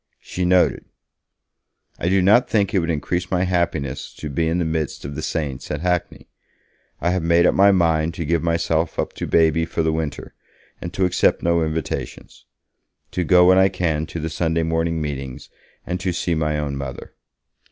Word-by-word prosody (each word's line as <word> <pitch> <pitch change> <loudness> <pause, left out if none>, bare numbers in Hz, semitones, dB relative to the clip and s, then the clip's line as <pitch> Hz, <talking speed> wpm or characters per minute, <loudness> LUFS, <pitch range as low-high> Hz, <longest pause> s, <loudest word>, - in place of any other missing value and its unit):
She 90 - -4
noted: 90 0 +2 1.1
'I 85 - 0
do 95 0 +3
not 110 +6 +4
think 100 -3 +1
it 95 - +3
would 85 -1 -2
increase 90 +4 -2
my 90 -1 +1
happiness 85 -7 -2
to 75 - -6
be 80 +3 0
in 85 +2 0
the 85 - 0
midst 80 -3 -3
of 70 - -5
the - - -5
saints 70 -5 -4
at 75 0 -3
Hackney. 90 -1 -2 0.7
I 85 - 0
have 95 0 0
made 85 +1 +3
up - - +4
my 100 +1 +5
mind 80 -3 +1
to 85 - -4
give 85 +1 +1
myself 85 -1 0
up - - -2
to - - -5
Baby 80 0 +3
for 80 0 -2
the 80 0 +1
winter, 80 -3 -4 0.5
and 85 - -5
to 95 - +2
accept 90 - +2
no 85 0 +2
invitations. 80 0 -4 0.7
To 90 - -1
go 90 +1 +5
when 95 0 +6
I 95 0 +5
can 80 -4 -1
to 85 - -6
the 80 +1 -4
Sunday 80 0 0
morning 80 0 0
meetings 70 -3 -6 0.4
and 90 +1 -3
to 90 0 -2
see 85 0 -1
my 75 -1 0
own 70 -2 -3
Mother.' 70 -2 -7
85 Hz, 195 wpm, -21 LUFS, 80-90 Hz, 1.1 s, when